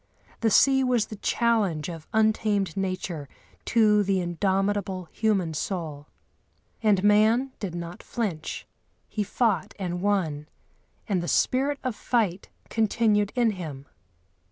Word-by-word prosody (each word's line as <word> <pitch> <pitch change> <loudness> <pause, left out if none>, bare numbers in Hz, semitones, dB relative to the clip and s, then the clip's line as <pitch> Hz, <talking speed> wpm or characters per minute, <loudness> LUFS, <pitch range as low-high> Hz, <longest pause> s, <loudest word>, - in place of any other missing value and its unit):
The 225 - +2
sea 265 +5 +5
was 245 -4 +2
the 215 - -8
challenge 200 -11 +1
of 165 -3 -8
untamed 215 -4 +1
nature 185 -6 -3 0.4
to 215 -2 +4
the 195 -1 +1
indomitable 190 +1 -1
human 195 -7 0
soul. 155 -3 -4 0.7
And 205 -4 +3
man 220 +6 +4
did 185 -5 -4
not 170 0 -6
flinch; 190 -10 -4 0.4
he 215 - -3
fought 205 -4 0
and 180 -3 -3
won, 165 -7 0 0.6
and 195 -5 0
the 175 - -4
spirit 275 +8 +1
of 255 -4 -2
fight 205 -7 -1 0.2
continued 215 -2 +2
in 240 -3 +3
him. 155 -8 -7
200 Hz, 125 wpm, -26 LUFS, 175-220 Hz, 0.7 s, sea